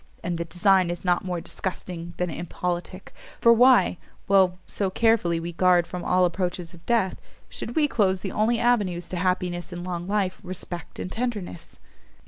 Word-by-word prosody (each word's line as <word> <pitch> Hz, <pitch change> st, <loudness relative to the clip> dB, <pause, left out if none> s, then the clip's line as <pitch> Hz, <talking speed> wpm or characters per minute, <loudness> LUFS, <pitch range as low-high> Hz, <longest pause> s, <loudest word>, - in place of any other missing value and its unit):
and 175 Hz, -1 st, -2 dB
the 170 Hz, -, -2 dB
design 185 Hz, +2 st, +3 dB
is 175 Hz, +1 st, -5 dB
not 175 Hz, -1 st, +2 dB
more 180 Hz, -2 st, -2 dB
disgusting 175 Hz, -1 st, -6 dB
than 180 Hz, -1 st, -1 dB
impolitic; 175 Hz, +2 st, -4 dB, 0.3 s
for 235 Hz, -, +6 dB
why, 235 Hz, -7 st, +5 dB, 0.3 s
while 190 Hz, -2 st, +4 dB
so 195 Hz, -2 st, -2 dB
carefully 190 Hz, -5 st, +2 dB
we 170 Hz, +1 st, -5 dB
guard 180 Hz, 0 st, +4 dB
from 180 Hz, +1 st, -6 dB
all 180 Hz, 0 st, +3 dB
approaches 180 Hz, -1 st, -2 dB
of 170 Hz, -1 st, -15 dB
death, 225 Hz, -6 st, +1 dB, 0.3 s
should 235 Hz, -, -5 dB
we 305 Hz, -2 st, +4 dB
close 190 Hz, -8 st, +1 dB
the 190 Hz, -, -4 dB
only 225 Hz, +3 st, +1 dB
avenues 205 Hz, -8 st, +1 dB
to -, -, -5 dB
happiness 180 Hz, 0 st, -1 dB
in 175 Hz, 0 st, -6 dB
long 175 Hz, -1 st, -4 dB
life, 200 Hz, -2 st, 0 dB
respect 180 Hz, -2 st, -6 dB
and 185 Hz, -, -5 dB
tenderness?" 220 Hz, -8 st, -4 dB
180 Hz, 170 wpm, -25 LUFS, 175-200 Hz, 0.3 s, for